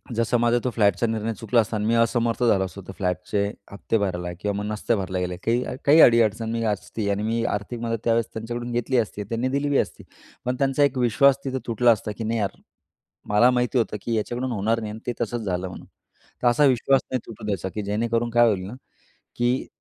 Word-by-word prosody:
जसं 115 +2 +1
माझा 120 0 +3
तो 125 - 0
फ्लॅटचा 100 0 +2
निर्णय 110 0 -2
चुकला 115 +1 +2
असता 110 +1 -4
आणि 105 - -2
मी 115 - +2
असमर्थ 115 +1 +1
झालो 105 -5 +3
असतो, 95 +2 -9
तर - - -6
फ्लॅटचे 90 +2 -1 0.3
हफ्ते 100 +2 -1
भरायला 90 -3 -2
किंवा 105 +1 -1
मग 105 - -3
नसते 105 +2 0
भरला 95 -2 -3
गेले, 90 0 -2
काही 120 +2 +2 0.2
काही 150 +3 +6
अडी-अडचण 115 -1 +4
मी 115 0 -1
असती 105 0 -2
आणि 100 +1 -1
मी 115 +1 0
आर्थिक 105 +4 -5
मदत 115 0 -2
त्यावेळेस 115 0 +2
त्यांच्याकडून 120 +2 -5
घेतली 120 +2 0
असती, 105 -2 -1
त्यांनी 115 +5 -2
दिली 140 +2 0
बी 140 - +2
असती - - -2 0.4
पण 125 +1 0
त्यांचा 135 +1 +2
एक 140 -2 +1
विश्वास 125 +3 +4
तिथं 130 -1 -2
तुटला 120 +1 +4
असता, 105 -1 -1
की 115 - -4
नाही 115 +1 -1
यार, 100 -2 -2 0.7
मला 105 +5 +5
माहिती 125 +1 0
होतं 115 -3 0
की 115 +2 -2
याच्याकडून 120 +4 -2
होणार 110 +1 0
नाही 110 -2 -5
आणि 110 - -8
ते 120 - 0
तसंच 120 +1 -2
झालं 95 -3 -2
म्हणून, 90 - -10 0.6
तर 125 - +4
असा 145 +5 +4
विश्वास 135 0 +3
नाही 130 - 0
तुटू 110 -2 -9
द्यायचा 95 -2 -2
की 105 - -2
जेणेकरून 115 +3 -1
काय 120 0 +5
होईल 95 -4 0
ना 110 - -8 0.6
की 120 +2 0
115 Hz, 220 wpm, -24 LUFS, 105-120 Hz, 0.7 s, काही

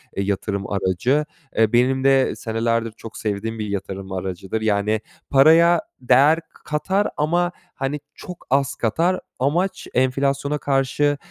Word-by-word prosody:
eee, 100 - -1
yatırım 100 0 -2
aracı. 105 +10 +1 0.3
E, 110 0 +3
benim 130 +2 +3
de 135 -1 +3
senelerdir 115 0 -1
çok 115 - -10
sevdiğim 110 +1 -3
bir 105 - -3
yatırım 95 -1 -5
aracıdır. 95 +3 -4
Yani, 105 0 +1 0.3
paraya 165 +5 +6 0.2
değer 135 +6 +5
k - - -25
katar 190 +7 0
ama 175 +4 +1 0.2
hani 140 +2 -2 0.2
çok 180 -2 -10
az 140 +1 +1
katar. 165 - +1 0.2
Amaç, 170 +9 0
enflasyona 140 +3 +1
karşı, 140 +1 +1
130 Hz, 135 wpm, -22 LUFS, 110-150 Hz, 0.3 s, paraya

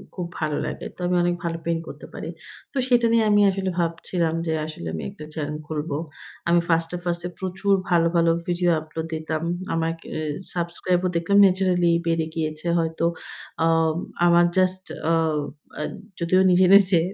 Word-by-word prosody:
খুব 180 - -3
ভালো 155 -2 -1
লাগে - - -5
তো - - -24
আমি 180 - +1
অনেক 175 0 +1
ভালো 165 -1 -2
পেইন্ট 165 -1 0
করতে - - -9
পারি। - - -6 0.4
তো 275 - -5
সেটা 240 -2 +4
নিয়ে 230 -1 +4
আমি 205 - +5
আসলে 190 0 -1
ভাবছিলাম 170 0 -1
যে 160 - +1
আসলে 155 - -7
আমি 80 - -4
একটা 150 - -10
চ্যানেল 150 -1 -3
খুলব। 155 0 -3 0.6
আমি 170 0 +5
ফার্স্টে, 165 +1 +1
ফার্স্টে 175 0 -2
প্রচুর 190 +2 0 0.2
ভালো, 170 -1 +4
ভালো 165 0 +4 0.2
ভিডিও 175 0 +1
আপলোড 160 +1 -6
দিতাম। 160 0 -3 0.3
আমার 165 0 0 0.3
এ - - -2 0.4
সাবস্ক্রাইবার 175 +1 0
ও - - -4
দেখলাম 185 +4 +2
ন্যাচারালি 180 -2 +3 0.2
বেড়ে 165 -1 +1
গিয়েছে 155 0 -3
হয়তো 165 0 -1 0.6
আম 165 -1 +3 0.3
আমার 175 0 +6
জাস্ট, 185 0 +2 0.3
আ - - +4 0.7
আ - - -2 0.4
যদিও 175 +2 +3
নিজে, 180 +1 +5
নিজে 195 -3 +6
170 Hz, 170 wpm, -24 LUFS, 165-185 Hz, 0.7 s, আমার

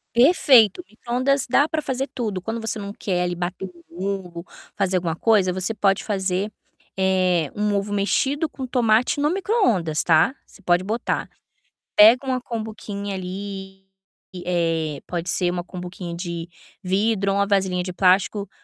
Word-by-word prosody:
Perfeito. 255 - +5
Micro-ondas 255 +4 -1
dá 280 +4 +4
para 320 -1 -1
fazer 265 -1 -2
tudo. 215 -8 -3
Quando 225 +4 -4
você 225 0 -3
não 200 -1 -6
quer 180 -4 -2
ali 175 - -1
bater 180 +2 -4
um 175 -2 -13 0.2
ovo, 180 -4 -4 0.3
fazer 195 -2 +1
alguma 170 -2 -2
coisa, 195 -2 +3
você 185 +3 -2
pode 200 -2 +1
fazer, 195 0 -1 0.5
eh, 185 -4 +2
um 210 0 0
ovo 200 +1 -2
mexido 270 +10 0
com 260 -2 -6
tomate 240 +2 +2
no 295 - +2
micro-ondas, 245 - +1
tá. 165 - +4
Você - - -19
pode 175 -1 +2
botar. 220 +5 -2 0.7
Pega 235 +6 +7
uma 255 -1 0
cumbuquinha 215 -4 -5
ali, 190 +1 -7 0.6
eh, 165 -4 -1
pode 175 0 -4
ser 175 0 +1
uma 175 0 -3
cumbuquinha 180 -1 -7
de 170 -1 -5 0.3
vidro 200 +1 +1
ou - - -1
uma 200 - +2
vasilhinha 190 -3 +1
de 180 0 -5
plástico, 190 +2 +2
195 Hz, 155 wpm, -23 LUFS, 180-225 Hz, 0.7 s, Pega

